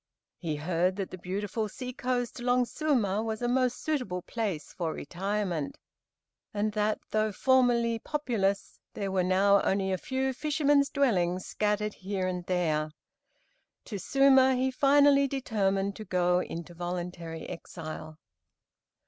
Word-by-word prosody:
He 160 -4 -2
heard 175 +4 0
that 195 -2 -4
the 185 - -6
beautiful 205 +4 -3
sea 250 +4 -6
coast 245 -1 -2
along 245 +1 +2
Suma 235 -9 0
was 220 -1 -3
a - - +2
most 250 0 +1
suitable 250 - -2
place 205 -10 -3
for 165 -3 -2
retirement, 185 -3 -3 0.8
and 210 +1 +1
that, 210 0 +1
though 215 0 +1
formerly 235 0 +3
populous, 220 -9 -1 0.2
there 200 -1 -2
were 190 -1 +2
now 195 +2 +4
only 190 0 +1
a 185 - -1
few 265 +4 -1
fishermen's 290 0 +2
dwellings 185 - +1
scattered 210 0 -1
here 190 0 -3
and 180 -1 -3
there. 155 -4 +1 1.0
To 205 -4 -5
Suma 265 +4 +5
he 260 +1 +1
finally 280 +1 +5
determined 200 -7 0
to 215 - -6
go 180 -1 +2
into 170 -1 -6
voluntary 175 -1 -5
exile. 155 -2 -8
205 Hz, 135 wpm, -29 LUFS, 180-250 Hz, 1.0 s, Suma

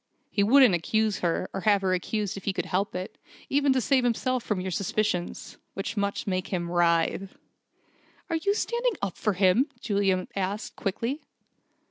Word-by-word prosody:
He 205 - +1
wouldn't 245 +1 +6
accuse 215 +5 +1
her, 175 +1 0
or 195 - -3
have 205 -2 +3
her 185 -1 +2
accused 205 +2 -2
if 195 - -8
he 200 - 0
could - - -2
help 195 +2 -1
it, 185 +1 -6 0.3
even 280 0 +3
to 260 - +2
save 260 +1 +2
himself 245 +1 0
from 210 -3 -1
your 185 0 -3
suspicions, 180 -1 -2 0.2
which 195 +3 -4
must 200 -1 -1
make 185 -1 -1
him 175 -2 -3
writhe!" 175 +2 +1 0.9
"Are 330 - 0
you 400 +5 +1
standing 475 +2 0
up 195 -3 -2
for 210 - 0
him?" 190 - +3
Juliet 200 -5 0
asked, 200 +2 -3
quickly. 230 +8 -2
200 Hz, 170 wpm, -27 LUFS, 185-235 Hz, 0.9 s, wouldn't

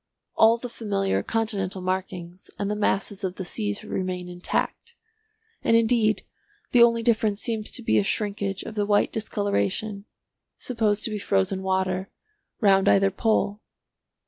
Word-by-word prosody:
All 225 +1 +5
the 245 - -6
familiar 200 -4 -1
continental 205 -4 -1
markings 185 -1 -4
and 200 0 -2
the - - 0
masses 205 -1 0
of 185 -1 -2
the 190 - -5
seas 205 +2 -3
remain 185 -3 -3
intact, 180 - -3 0.7
and 230 - +4
indeed 225 -2 +2 0.5
the 245 - +5
only 230 -1 +5
difference 215 -3 +2
seems 220 -3 -2
to 245 - -3
be - - +3
a - - +2
shrinkage 200 -2 -2
of - - -7
the 205 -1 -1
white 205 -1 +2
discoloration 205 - -1 0.5
(supposed 220 -4 0
to 225 - -1
be 210 - -3
frozen 190 - +1
water) 190 0 -1 0.5
round 195 -3 +4
either 195 0 +4
pole." 210 0 0
205 Hz, 145 wpm, -25 LUFS, 190-220 Hz, 0.7 s, All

